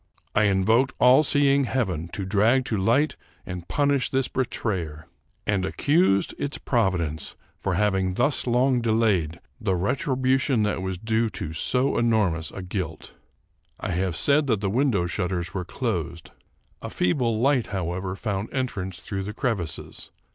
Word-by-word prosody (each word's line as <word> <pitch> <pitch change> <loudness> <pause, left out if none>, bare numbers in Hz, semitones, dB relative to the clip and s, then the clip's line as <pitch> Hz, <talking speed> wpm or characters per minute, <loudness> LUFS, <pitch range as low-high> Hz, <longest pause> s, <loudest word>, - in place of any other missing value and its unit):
I 105 - +3
invoked 110 +7 +2
all 125 +4 +7
seeing 140 -2 +3
heaven 95 -11 -1
to 100 - -3
drag 110 +7 +3
to 115 - -2
light 115 +10 +2 0.3
and 90 -2 -7
punish 140 -2 +1
this 135 -1 +1
betrayer, 90 - -3 0.4
and 100 -3 +1
accused 145 - +2
its 145 - -2
providence 90 - -1 0.2
for 95 -3 -1
having 95 -2 +1
thus 145 +3 +1
long 125 +1 +2
delayed 110 -8 +1 0.2
the 95 -4 0
retribution 130 - +1
that 105 -2 -1
was 95 -1 -3
due 110 +3 0
to 80 - -5
so 125 - +1
enormous 105 -9 +1
a 95 - -8
guilt. 90 -4 -5 0.7
I - - -3
have 90 0 -1
said 145 +1 +3
that 110 -5 +2
the 100 -1 -1
window 120 -7 +2
shutters 90 -2 -2
were 90 -2 -3
closed. - - -4 0.5
A - - -5
feeble 115 +4 0
light, 130 -1 +2
however, 95 0 -3
found 100 0 -3
entrance 95 -9 -3
through 100 +1 -4
the 105 +2 -5
crevices. 110 - -3
105 Hz, 145 wpm, -25 LUFS, 95-130 Hz, 0.7 s, all